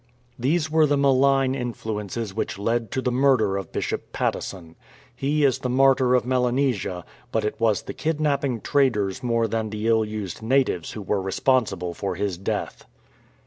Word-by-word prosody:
These 155 +5 0
were 160 -1 +4
the 145 0 +2
malign 135 -1 +3
influences 110 -4 -4
which 110 - -3
led 115 +2 -1
to 130 - -2
the 125 - +1
murder 125 -6 +3
of 100 -1 -5
Bishop - - -3
Patteson. 85 -3 -3 0.4
He 145 +2 +1
is 135 - +2
the 125 - -3
Martyr 130 0 +4
of 125 -2 +1
Melanesia, 125 -8 0 0.3
but 110 -1 0
it 105 - -3
was 110 -4 +2
the - - -6
kidnapping 145 -6 -1
traders 125 -7 +1
more 115 -2 +1
than 110 0 -2
the 105 +1 -3
ill 110 -1 +4
used 105 -4 -5
natives 115 -8 +1
who 105 - -6
were 100 +1 0
responsible 95 -3 0
for 95 0 -3
his 95 -1 -2
death. 95 - -4
115 Hz, 165 wpm, -24 LUFS, 105-135 Hz, 0.4 s, were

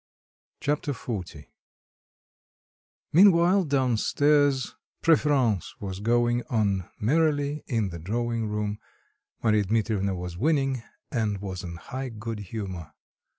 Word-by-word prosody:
Chapter 145 0 0
XL 115 -3 -4 1.9
Meanwhile, 180 +1 +6
down 130 -5 +1
stairs, 145 +1 +2 0.3
preference 140 - +2
was 95 -2 -5
going 120 +2 +2
on 100 -6 0
merrily 145 +3 +1
in 110 -5 0
the 85 -1 -7
drawing 115 +5 -2
room; 105 0 -2 0.6
Marya 110 -2 +3
Dmitrievna 105 -2 0
was 90 -1 -6
winning, 135 -3 +1 0.3
and 110 -4 0
was 95 -2 -6
in 85 -1 -6
high 130 +9 -6
good 115 -1 -6
humour. 95 -5 -6
115 Hz, 110 wpm, -26 LUFS, 100-140 Hz, 1.9 s, Meanwhile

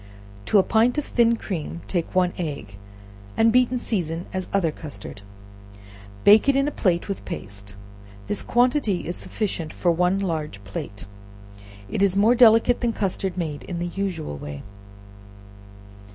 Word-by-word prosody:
To - - +4
a 195 - +6
pint 230 +6 +2
of 295 - -1
thin 235 -1 +3
cream, 170 -5 -5
take 175 -2 -3
one 180 -1 +3
egg, 140 - -5 0.6
and 225 0 +5
beat 250 0 +4
and 250 0 -2
season 175 -7 -2
as 185 -1 -3
other 185 -5 +1
custard; 145 -9 -9 1.0
bake 215 +6 +7
it 275 - +4
in 275 +1 +2
a - - -1
plate 175 -9 0
with 195 -2 -4
paste; 100 0 -7 0.5
this 205 - -1
quantity 245 -5 +2
is 175 - -3
sufficient 175 -7 -3
for 175 - +1
one 180 +3 +2
large 155 - -3
plate, 100 +1 -7 0.8
and 145 - -3
is 195 -1 +3
more 215 +4 +5
delicate 235 0 +5
than 235 -2 +1
custard 190 -2 -2
made 155 -5 -3
in 175 - -5
the 175 - -2
usual 175 - -3
way. 70 0 -7
185 Hz, 155 wpm, -24 LUFS, 160-225 Hz, 1.0 s, bake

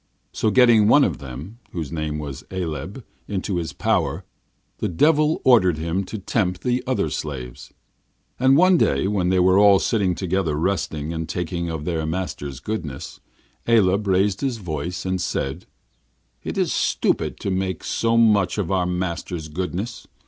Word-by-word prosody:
So 110 - 0
getting 115 -3 +5
one 145 +6 +6
of - - 0
them, 70 - -9
whose 80 -5 -4
name 75 -2 -3
was 70 -3 -6
Aleb, 95 - -5 0.2
into 95 -2 -2
his 85 -2 -3
power, - - -1 0.5
the - - -1
Devil 150 - +3
ordered 95 -10 +5
him 85 +4 -1
to 110 - -6
tempt 95 -2 -1
the 125 0 0
other - - 0
slaves. 65 -5 -6 0.7
And 130 +2 +5
one 180 0 +5
day, 70 +7 +2
when 95 -3 0
they 95 - +2
were 95 +2 +5
all 100 -1 +7
sitting 95 -3 +1
together 95 -4 -1
resting 80 -2 -2
and 80 -1 -4
talking 85 0 -3
of 80 -2 -4
their 80 -2 -2
master's 80 -6 -4
goodness, 85 -12 -5 0.5
Aleb 105 -3 +3
raised 95 +1 +2
his 130 -4 -1
voice, 90 -1 -4
and 95 -1 -1
said: 70 0 -3 0.8
'It - - -5
is - - +1
stupid - - 0
to 100 - -2
make 95 -3 -2
so 115 0 0
much 105 -5 +3
of 100 -3 -2
our 90 -2 +1
master's 90 -2 -3
goodness. 95 +7 -4
95 Hz, 160 wpm, -22 LUFS, 80-105 Hz, 0.8 s, all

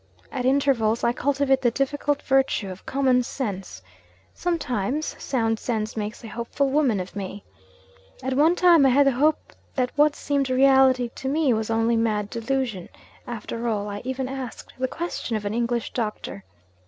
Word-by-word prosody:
At 255 -2 -3
intervals 260 -5 +2
I 235 - +3
cultivate 270 0 +1
the 240 - +4
difficult 285 +3 -1
virtue 265 -7 +1
of 185 - -11
common 260 -2 +3
sense. 195 - -5 0.5
Sometimes, 295 - -2
sound 225 -4 0
sense 220 -3 -2
makes 215 +1 -5
a - - -7
hopeful 235 +5 -2
woman 270 -8 +2
of 185 +2 -6
me. 200 0 -6 0.8
At 265 +1 -1
one 310 +6 +4
time, 350 -4 +6
I 270 - +6
had 280 +3 +5
the 275 - +5
hope 295 +5 +1 0.2
that 250 -2 0
what 295 0 +4
seemed 280 -2 -1
reality 260 -1 +4
to 265 - -4
me 290 -3 +2
was 220 0 -2
only 225 +1 +2
mad 210 -2 0
delusion, 235 -5 -2 0.4
after 235 0 -4
all 210 -3 -1
I 205 0 -5
even 260 +1 -3
asked 260 -2 -7
the 260 - +1
question 320 -6 -4
of 210 - -7
an 205 - -2
English 235 0 -1
doctor! 210 - -4
250 Hz, 165 wpm, -24 LUFS, 225-275 Hz, 0.8 s, time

